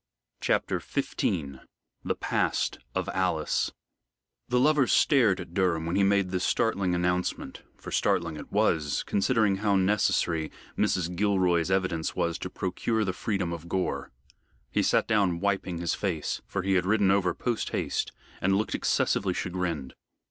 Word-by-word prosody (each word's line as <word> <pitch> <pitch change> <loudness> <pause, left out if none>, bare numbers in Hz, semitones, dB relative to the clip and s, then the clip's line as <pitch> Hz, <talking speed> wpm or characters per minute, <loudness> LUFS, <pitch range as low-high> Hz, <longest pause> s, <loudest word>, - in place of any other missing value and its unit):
CHAPTER - - 0
XV 70 -7 -2 0.4
THE - - -1
PAST - - 0 0.2
OF - - -1
ALICE - - 0 0.8
The 125 0 +3
lovers 145 -1 +3
stared 120 -10 +4
at 85 - -8
Durham 85 -4 +1
when 85 +2 -2
he 100 - +3
made 100 -1 +2
this 90 -1 -1
startling 100 -5 +1
announcement, 90 +1 -1 0.2
for - - -9
startling 85 -2 +1
it 75 - -9
was, 75 -3 +1
considering 105 -2 +2
how 100 0 +1
necessary 95 -5 +1 0.2
Mrs. 90 -1 0
Gilroy's 90 -4 +2
evidence 90 -4 0
was 85 -1 -1
to - - -5
procure 110 +4 -1
the 95 - -1
freedom 95 -4 -2
of 85 0 -8
Gore. 95 0 -2 0.6
He - - +2
sat - - +2
down 100 -6 +2
wiping 95 -2 -1
his 85 0 -1
face 85 -7 -2
for 100 - -3
he 95 +1 +1
had 90 -1 +2
ridden 100 -2 +3
over 90 -3 +2
post 120 -3 -2
haste - - -2 0.3
and 95 +1 +3
looked 110 - -1
excessively 95 -2 +1
chagrined. 85 -7 -3
95 Hz, 150 wpm, -28 LUFS, 85-100 Hz, 0.8 s, stared